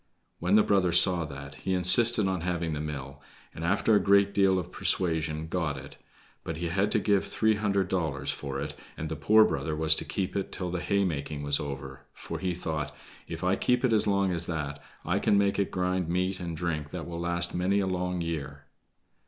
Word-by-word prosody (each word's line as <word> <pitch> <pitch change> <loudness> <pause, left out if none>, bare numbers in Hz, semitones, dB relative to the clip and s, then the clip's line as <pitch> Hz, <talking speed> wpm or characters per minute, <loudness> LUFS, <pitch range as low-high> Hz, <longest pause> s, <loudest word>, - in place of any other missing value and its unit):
When 90 +4 +2
the 105 - +6
brother 95 -4 +2
saw 90 -1 +6
that, 70 -1 -9
he 95 - -1
insisted 105 +4 +5
on 95 -2 -1
having 85 -2 -2
the 75 - -3
mill, 70 -2 -6 0.3
and 80 - -7
after 100 +5 +2
a 105 - +6
great 100 0 +3
deal 95 -1 +3
of 90 -1 -4
persuasion 80 -3 0
got 80 -4 -2
it; 65 - -10 0.5
but 80 - -5
he 85 0 -3
had 100 +4 0
to - - +3
give 100 0 +2
three 110 0 +1
hundred 100 -3 0
dollars 80 -7 -1
for 70 -1 -5
it, 75 +1 -4 0.2
and 80 - -4
the 80 - -3
poor 110 +10 +5
brother 80 -1 -2
was 80 +1 +4
to - - -3
keep 95 -2 -3
it 100 - -2
till 90 -1 -4
the 90 -1 -3
haymaking 75 -8 -1
was 70 0 +2
over, 70 -2 -7
for - - -7
he 90 -2 -2
thought: 75 -4 -3 0.4
"If - - -6
I - - +2
keep 125 +1 +1
it 120 - +2
as 105 - +2
long 100 -2 +2
as 85 -1 -1
that, 75 -4 -4 0.2
I - - +1
can 100 - +3
make 100 0 +1
it 100 - 0
grind 90 -1 -1
meat 95 +2 -1
and 85 -3 -5
drink 75 -3 -3
that 80 -1 -6
will 85 -1 -6
last 85 0 0
many 95 +3 +1
a 100 - 0
long 90 -1 -2
year." 70 -4 -5
85 Hz, 215 wpm, -28 LUFS, 75-95 Hz, 0.5 s, the